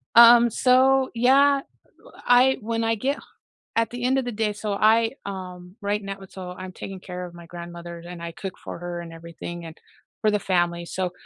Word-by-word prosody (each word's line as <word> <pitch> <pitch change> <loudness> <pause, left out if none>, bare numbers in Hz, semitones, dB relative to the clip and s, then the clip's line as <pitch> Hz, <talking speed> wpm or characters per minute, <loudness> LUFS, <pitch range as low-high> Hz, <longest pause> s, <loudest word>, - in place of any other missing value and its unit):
Um, 235 0 +9
so 260 +2 +4
yeah, 275 +4 +4 0.6
I 250 +2 +5
when 230 +1 -2
I 225 0 +2
get 270 +6 -1
h - - -10 0.6
at 230 0 +2
the 245 0 -5
end 260 +2 +3
of 265 - 0
the 245 - -3
day, 215 -1 0
so 210 0 -4
I 225 +3 +4
um, 180 -1 -8
right 205 +1 -1
now 195 0 -6
so, 185 -1 -8
I'm 185 0 -8
taking 190 0 -8
care 180 0 -6
of 175 - -13
my 170 -1 -12
grandmother, 170 0 -8
and 175 -1 -8
I 170 0 -5
cook 190 +2 -6
for - - -7
her 175 0 -5
and 170 -1 -9
everything, 170 +1 -8
and 165 0 -9 0.4
for 215 - +3
the 210 - +1
family, 175 -3 0
so 185 +1 -3
200 Hz, 205 wpm, -24 LUFS, 175-235 Hz, 0.6 s, Um